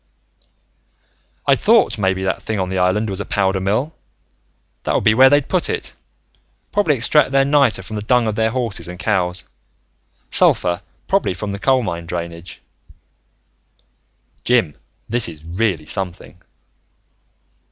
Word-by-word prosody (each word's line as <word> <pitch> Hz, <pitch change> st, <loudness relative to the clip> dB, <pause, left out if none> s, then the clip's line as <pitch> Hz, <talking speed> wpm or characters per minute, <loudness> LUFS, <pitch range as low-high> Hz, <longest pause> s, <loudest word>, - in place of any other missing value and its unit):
"I'd -, -, +3 dB
thought -, -, +3 dB
maybe 95 Hz, -1 st, 0 dB
that 95 Hz, -, -1 dB
thing 110 Hz, -, -3 dB
on 95 Hz, -1 st, -2 dB
the 95 Hz, 0 st, -1 dB
island 95 Hz, +4 st, +1 dB
was 95 Hz, -2 st, -4 dB
a -, -, -2 dB
powder 95 Hz, -2 st, 0 dB
mill. 110 Hz, +11 st, -1 dB, 0.9 s
That -, -, -1 dB
would -, -, +1 dB
be 110 Hz, -, +4 dB
where 130 Hz, +4 st, +7 dB
they'd 145 Hz, 0 st, +2 dB
put 185 Hz, -2 st, 0 dB
it. -, -, -4 dB, 0.8 s
Probably 200 Hz, -8 st, +2 dB
extract 135 Hz, +4 st, +2 dB
their 135 Hz, 0 st, +3 dB
niter 140 Hz, -9 st, +3 dB
from 110 Hz, +3 st, -6 dB
the -, -, -3 dB
dung 120 Hz, +2 st, +2 dB
of 110 Hz, -, -1 dB
their 110 Hz, +1 st, +1 dB
horses 115 Hz, -6 st, -2 dB
and 90 Hz, 0 st, -8 dB
cows. 90 Hz, -1 st, -1 dB, 0.9 s
Sulfur 90 Hz, +1 st, +2 dB, 0.3 s
probably 195 Hz, -, +1 dB
from 100 Hz, +2 st, -4 dB
coal 130 Hz, +2 st, +2 dB
mine 85 Hz, -5 st, -5 dB
drainage. 85 Hz, 0 st, -7 dB, 1.8 s
"Jim, 115 Hz, -11 st, +2 dB, 0.3 s
this 120 Hz, -3 st, +1 dB
is 80 Hz, -1 st, -12 dB
really 85 Hz, -2 st, -1 dB
something!" 90 Hz, +1 st, -4 dB
100 Hz, 140 wpm, -19 LUFS, 90-125 Hz, 1.8 s, where